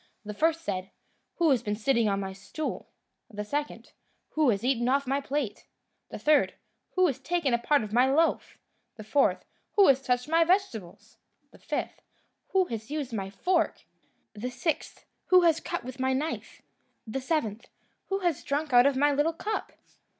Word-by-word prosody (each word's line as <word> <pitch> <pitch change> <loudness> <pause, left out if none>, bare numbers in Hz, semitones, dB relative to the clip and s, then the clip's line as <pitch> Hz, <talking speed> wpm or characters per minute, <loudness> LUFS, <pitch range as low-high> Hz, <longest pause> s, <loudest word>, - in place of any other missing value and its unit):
The 210 - -5
first 325 +8 +1
said, 185 - -4 0.5
"Who 335 -3 +3
has 255 - +3
been 210 -3 -2
sitting 230 0 +2
on 195 0 0
my 190 -1 -4
stool?" 195 +11 -5 0.4
The 210 -2 -6
second, 290 +6 -4 0.4
"Who 310 -4 +3
has 200 -2 0
eaten 250 -2 +1
off 280 +1 +2
my 275 +2 0
plate?" 275 -6 -3 0.4
The - - -6
third, 300 -1 +3 0.4
"Who 370 0 +4
has 280 -8 0
taken 325 -7 0
part 280 +2 +2
of 210 0 -7
my 250 +3 +4
loaf?" 325 +4 +1 0.4
The 215 - -9
fourth, 275 +6 +2 0.3
"Who 400 -2 +7
has 270 -1 +4
touched 250 -1 0
my 330 +2 +4
vegetables?" 330 - -1 0.3
The - - -18
fifth, - - -4 0.5
"Who 380 -1 +2
has 220 -7 -6
used 290 -5 -4
my 195 -3 -3
fork?" 345 - 0 0.5
The 215 +4 -4
sixth, 270 +6 -3 0.2
"Who 365 -1 +7
has 330 -2 +4
cut 345 +1 -4
with 255 +1 -8
my 260 0 +1
knife?" 295 +5 -4 0.4
The 240 +4 -4
seventh, 250 -6 -2 0.4
"Who 390 0 -1
has 345 -6 0
drunk 290 0 -2
out 245 +2 +7
of 280 -2 +1
my 290 +2 +4
little 295 +4 +1
cup?" 425 +6 -4
275 Hz, 175 wpm, -28 LUFS, 230-320 Hz, 0.5 s, Who